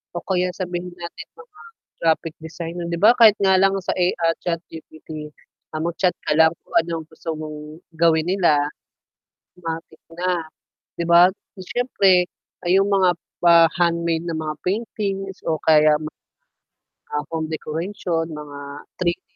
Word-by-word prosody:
o 175 Hz, -, -4 dB
kaya 180 Hz, -1 st, 0 dB
sabihin 180 Hz, -1 st, -4 dB
natin 170 Hz, -1 st, -8 dB
mga 450 Hz, -2 st, -17 dB, 0.4 s
graphic 160 Hz, 0 st, +1 dB
designer. 170 Hz, +2 st, -6 dB
'Di 170 Hz, 0 st, -2 dB
ba, 235 Hz, +4 st, +6 dB
kahit 225 Hz, -3 st, +8 dB
nga 190 Hz, -1 st, +5 dB
lang 195 Hz, +1 st, +4 dB
sa -, -, -2 dB
A 180 Hz, -, +3 dB, 0.2 s
ah, 165 Hz, 0 st, +2 dB
ChatGPT, 160 Hz, -2 st, -6 dB, 0.4 s
ah, 155 Hz, -, -3 dB
mag-chat 170 Hz, +2 st, 0 dB, 0.2 s
ka 150 Hz, -, +2 dB
lang 160 Hz, 0 st, +6 dB
kung -, -, -20 dB
ano 170 Hz, +1 st, +2 dB
ang 155 Hz, -, -15 dB
gusto 160 Hz, +1 st, -5 dB
mong 155 Hz, +1 st, -8 dB, 0.2 s
gawin 165 Hz, 0 st, +3 dB
nila, 155 Hz, -6 st, +3 dB, 0.9 s
matik 165 Hz, -1 st, -6 dB, 0.2 s
na, 175 Hz, -1 st, -1 dB, 0.5 s
'di 170 Hz, -, -2 dB
ba? 170 Hz, +2 st, +7 dB, 0.3 s
Siyempre 190 Hz, -4 st, +2 dB, 0.4 s
ayung 195 Hz, +3 st, +3 dB
mga 190 Hz, -3 st, +4 dB, 0.3 s
pa-handmade 170 Hz, 0 st, +3 dB
na 165 Hz, -2 st, -3 dB
mga 155 Hz, -1 st, -3 dB
paintings 195 Hz, -1 st, -3 dB
o 160 Hz, -1 st, -1 dB
kaya 155 Hz, -1 st, +5 dB
mga, 155 Hz, 0 st, -8 dB, 1.0 s
ah, 150 Hz, 0 st, -1 dB
home 160 Hz, -1 st, -2 dB
decoration, 165 Hz, +2 st, -3 dB
mga 150 Hz, -1 st, -8 dB, 0.4 s
3D 180 Hz, 0 st, -1 dB
170 Hz, 145 wpm, -22 LUFS, 160-180 Hz, 1.0 s, kahit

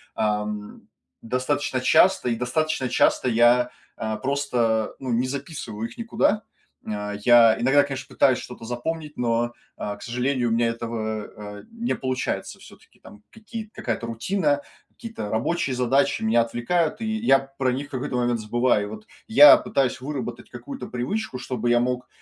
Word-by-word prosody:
ам, 105 Hz, -1 st, -3 dB, 0.3 s
достаточно 130 Hz, +3 st, -1 dB
часто, 185 Hz, +3 st, +4 dB
и 115 Hz, -, +1 dB
достаточно 130 Hz, +2 st, -1 dB
часто 125 Hz, -, +2 dB
я, 120 Hz, +1 st, +4 dB, 0.3 s
а, 110 Hz, 0 st, -2 dB
просто, 125 Hz, -5 st, 0 dB
ну, 130 Hz, -2 st, -4 dB
не 120 Hz, +2 st, +1 dB
записываю 130 Hz, -6 st, -5 dB
их -, -, -14 dB
никуда. 225 Hz, -2 st, +1 dB, 0.4 s
М, 110 Hz, -, -4 dB
а, 105 Hz, 0 st, -4 dB
я 115 Hz, -2 st, +6 dB
иногда, 135 Hz, +4 st, +5 dB
конечно, 135 Hz, -2 st, -5 dB
пытаюсь 130 Hz, -2 st, +4 dB
что-то 120 Hz, -2 st, -9 dB
запомнить, 150 Hz, +6 st, -4 dB
но, 120 Hz, 0 st, 0 dB, 0.2 s
а, 105 Hz, 0 st, -4 dB
к -, -, -18 dB
сожалению, 125 Hz, 0 st, -1 dB
у -, -, -2 dB
меня 115 Hz, 0 st, +2 dB
этого, 115 Hz, -2 st, -3 dB, 0.3 s
э, -, -, -13 dB
не 230 Hz, +1 st, -2 dB
получается, 130 Hz, 0 st, -3 dB
всё-таки, -, -, -17 dB
там 105 Hz, -, -15 dB
какие-то 220 Hz, 0 st, -8 dB
какая-то 115 Hz, 0 st, -3 dB
рутина, 145 Hz, -, 0 dB, 0.3 s
какие-то 225 Hz, -, -7 dB
рабочие 130 Hz, +5 st, -1 dB
задачи 135 Hz, +2 st, +1 dB
меня 115 Hz, +2 st, +4 dB
отвлекают, 155 Hz, -, 0 dB
и 225 Hz, -, -2 dB
я 220 Hz, -11 st, +5 dB, 0.2 s
про 130 Hz, -1 st, +2 dB
них 135 Hz, +3 st, -3 dB
в -, -, -26 dB
какой-то 130 Hz, -1 st, -3 dB
момент 120 Hz, -1 st, +1 dB
забываю. 110 Hz, -1 st, +1 dB
Вот 110 Hz, 0 st, -9 dB, 0.2 s
я 140 Hz, +5 st, +9 dB
пытаюсь 130 Hz, -2 st, -1 dB
выработать 125 Hz, -4 st, -5 dB
какую-то 275 Hz, -2 st, -8 dB
привычку, 130 Hz, -, -3 dB
чтобы 125 Hz, -2 st, -3 dB
я 120 Hz, -, +4 dB
мог, 125 Hz, +1 st, -1 dB
125 Hz, 160 wpm, -24 LUFS, 115-140 Hz, 0.4 s, я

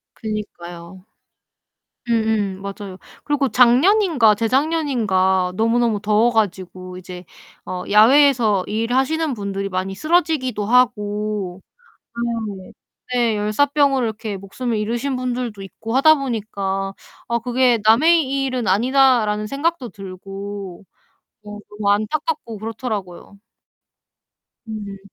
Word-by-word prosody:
그니까요. 185 Hz, -4 st, -7 dB, 1.0 s
음음 220 Hz, -4 st, 0 dB
맞아요. 200 Hz, -1 st, -7 dB, 0.3 s
그리고 285 Hz, -2 st, +1 dB
작년인가 260 Hz, -, +4 dB
재작년인가 225 Hz, -, +1 dB
너무너무 230 Hz, -1 st, +2 dB
더워 215 Hz, +3 st, +3 dB
가지고 185 Hz, -4 st, -2 dB
이제 180 Hz, 0 st, -10 dB, 0.4 s
어 180 Hz, 0 st, -5 dB
야외에서 225 Hz, -2 st, +5 dB
일하시는 260 Hz, +8 st, 0 dB
분들이 200 Hz, -3 st, -4 dB
많이 185 Hz, +1 st, -3 dB
쓰러지기도 310 Hz, -, 0 dB
하고 210 Hz, -5 st, 0 dB, 1.0 s
네 185 Hz, -, -14 dB, 0.4 s
네 235 Hz, -3 st, +1 dB
열사병으로 270 Hz, +4 st, +2 dB
이렇게 215 Hz, -2 st, -5 dB
목숨을 220 Hz, +4 st, -4 dB
잃으신 240 Hz, +6 st, -2 dB
분들도 250 Hz, -4 st, -3 dB
있고 220 Hz, +4 st, -7 dB
하다 315 Hz, +4 st, +6 dB
보니까 200 Hz, -7 st, -3 dB, 0.3 s
'아 235 Hz, -, +1 dB
그게 245 Hz, 0 st, +2 dB
남의 275 Hz, +3 st, +4 dB
일은 255 Hz, -3 st, -2 dB
아니다.'라는 225 Hz, 0 st, +3 dB
생각도 275 Hz, 0 st, -2 dB
들고 195 Hz, 0 st, -8 dB, 0.6 s
어 210 Hz, 0 st, -8 dB
너무 210 Hz, -1 st, -1 dB
안타깝고 230 Hz, +3 st, -1 dB
그렇더라고요. 210 Hz, -4 st, -6 dB, 1.3 s
음. 205 Hz, -2 st, -6 dB
220 Hz, 265 characters per minute, -20 LUFS, 200-255 Hz, 1.3 s, 하다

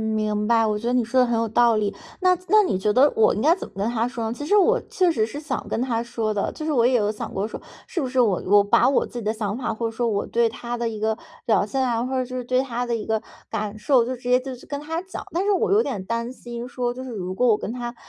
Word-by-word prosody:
明 210 Hz, 0 st, 0 dB
白。 230 Hz, -1 st, +4 dB
我 210 Hz, -1 st, 0 dB
觉 230 Hz, +3 st, -4 dB
得 245 Hz, -, +1 dB
你 250 Hz, -2 st, +3 dB
说 255 Hz, +3 st, +2 dB
的 -, -, +5 dB
很 240 Hz, -1 st, 0 dB
有 230 Hz, 0 st, 0 dB
道 235 Hz, +1 st, +4 dB
理， 210 Hz, -1 st, 0 dB, 0.3 s
那 365 Hz, 0 st, +5 dB
那 430 Hz, +1 st, +6 dB
你 365 Hz, -, 0 dB
觉 210 Hz, +3 st, +1 dB
得 265 Hz, +6 st, +5 dB
我 220 Hz, -, +4 dB
应 210 Hz, -, -2 dB
该 320 Hz, +5 st, +5 dB
怎 -, -, -7 dB
么 -, -, -22 dB
跟 200 Hz, +3 st, 0 dB
他 235 Hz, 0 st, 0 dB
说 235 Hz, -2 st, -4 dB
呢？ 220 Hz, -, -2 dB
其 290 Hz, +4 st, -6 dB
实 410 Hz, +7 st, +4 dB
我 455 Hz, +5 st, +4 dB
确 365 Hz, -2 st, +2 dB
实 220 Hz, -7 st, +1 dB
是 285 Hz, +6 st, -7 dB
想 305 Hz, +1 st, -4 dB
跟 -, -, -1 dB
他 240 Hz, -2 st, 0 dB
说 230 Hz, -2 st, -2 dB
的， 205 Hz, -, -1 dB
就 310 Hz, -, -6 dB
是 315 Hz, -, 0 dB
我 240 Hz, -5 st, +3 dB
也 255 Hz, -, +3 dB
有 210 Hz, -3 st, +2 dB
想 210 Hz, -, -6 dB
过 200 Hz, +3 st, -1 dB
说， -, -, -8 dB, 0.2 s
是 345 Hz, -, -3 dB
不 260 Hz, -, -2 dB
是 255 Hz, 0 st, 0 dB
我 210 Hz, -7 st, +3 dB
我 205 Hz, +1 st, +6 dB
把 200 Hz, -, +4 dB
我 275 Hz, -, +2 dB
自 -, -, -15 dB
己 -, -, -6 dB
的 215 Hz, -, +1 dB
想 215 Hz, -2 st, -3 dB
法， 245 Hz, -3 st, -2 dB
或 230 Hz, +1 st, -3 dB
者 -, -, -4 dB
说 240 Hz, +1 st, 0 dB
我 205 Hz, -3 st, 0 dB
对 235 Hz, -1 st, +2 dB
他 240 Hz, +2 st, -5 dB
的 235 Hz, -1 st, -2 dB
一 215 Hz, -2 st, -6 dB
个 220 Hz, +1 st, 0 dB, 0.3 s
表 215 Hz, -3 st, +3 dB
现 265 Hz, +6 st, -2 dB
啊， 240 Hz, -2 st, 0 dB
或 255 Hz, -, -3 dB
者 255 Hz, -1 st, 0 dB
就 255 Hz, +1 st, -7 dB
是 250 Hz, -, -3 dB
对 255 Hz, +1 st, +1 dB
他 245 Hz, -2 st, -3 dB
的 235 Hz, -, -1 dB
一 220 Hz, -, -4 dB
个 220 Hz, -1 st, 0 dB, 0.3 s
感 215 Hz, -1 st, -3 dB
受， 245 Hz, +2 st, +3 dB
就 255 Hz, +2 st, -3 dB
直 245 Hz, -, -18 dB
接 250 Hz, +1 st, +3 dB
就 260 Hz, 0 st, -6 dB
去 245 Hz, -, -15 dB
跟 285 Hz, 0 st, -5 dB
他 325 Hz, +3 st, -3 dB
讲。 380 Hz, -, -7 dB
但 355 Hz, +3 st, +1 dB
是 415 Hz, -, +2 dB
我 390 Hz, -, +1 dB
有 425 Hz, +3 st, +5 dB
点 195 Hz, -, -4 dB
担 230 Hz, +3 st, -3 dB
心 240 Hz, -1 st, -7 dB
说， 245 Hz, -2 st, -2 dB
就 255 Hz, +1 st, -7 dB
是 255 Hz, -, -7 dB
如 185 Hz, -4 st, -4 dB
果 250 Hz, +3 st, +2 dB
我 215 Hz, -, +4 dB
跟 210 Hz, -, -5 dB
他 240 Hz, 0 st, -5 dB
235 Hz, 340 characters per minute, -23 LUFS, 220-260 Hz, 0.3 s, 那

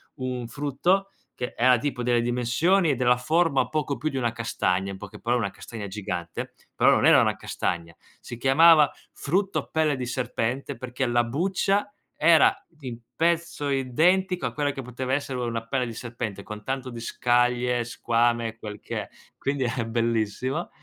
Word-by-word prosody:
un 125 Hz, -2 st, -4 dB
frutto 145 Hz, +10 st, 0 dB, 0.3 s
che 125 Hz, -, -4 dB
era 125 Hz, +1 st, +5 dB
tipo 130 Hz, -1 st, -3 dB
delle 120 Hz, -1 st, +2 dB
dimensioni 125 Hz, +10 st, +2 dB
e -, -, +1 dB
della 125 Hz, 0 st, +3 dB
forma 155 Hz, -1 st, +2 dB
poco 150 Hz, -3 st, -1 dB
più 155 Hz, +6 st, -1 dB
di 135 Hz, -, -4 dB
una 120 Hz, -3 st, 0 dB
castagna, 100 Hz, -5 st, -1 dB
in 95 Hz, -, -7 dB
poche 100 Hz, 0 st, -10 dB
parole 120 Hz, 0 st, 0 dB
una 100 Hz, -, -2 dB
castagna 110 Hz, -3 st, -8 dB
gigante, 90 Hz, -4 st, -5 dB, 0.2 s
però -, -, +4 dB
non -, -, +3 dB
era -, -, +7 dB
una -, -, +1 dB
castagna. 85 Hz, -1 st, -3 dB, 0.2 s
Si 120 Hz, -, -8 dB
chiamava: 150 Hz, +4 st, +6 dB, 0.2 s
"Frutto 195 Hz, +6 st, -1 dB
pelle 155 Hz, -2 st, +2 dB
di 125 Hz, -1 st, -4 dB
serpente" 125 Hz, +2 st, -2 dB
perché 130 Hz, 0 st, -3 dB
la 120 Hz, 0 st, +2 dB
buccia 190 Hz, -, 0 dB, 0.3 s
era 160 Hz, +1 st, +5 dB
di 135 Hz, -8 st, -8 dB, 0.2 s
pezzo 170 Hz, -3 st, 0 dB
identico 175 Hz, +8 st, +2 dB
a -, -, -2 dB
quella 145 Hz, -1 st, 0 dB
che 135 Hz, -1 st, -6 dB
poteva 125 Hz, +1 st, -4 dB
essere 135 Hz, -2 st, -2 dB
una 115 Hz, -2 st, -3 dB
pelle 130 Hz, 0 st, 0 dB
di 115 Hz, -, -6 dB
serpente, 110 Hz, -4 st, -5 dB
con 105 Hz, -1 st, -8 dB
tanto 130 Hz, -1 st, -3 dB
di 120 Hz, -2 st, -7 dB
scaglie, 120 Hz, 0 st, +1 dB
squame, 115 Hz, -1 st, 0 dB
quel 105 Hz, -2 st, -8 dB
che -, -, -4 dB
è. -, -, -10 dB, 0.3 s
Quindi 135 Hz, -2 st, -1 dB
era 120 Hz, -1 st, -1 dB
bellissimo. 115 Hz, +6 st, -1 dB
125 Hz, 170 wpm, -25 LUFS, 115-145 Hz, 0.3 s, era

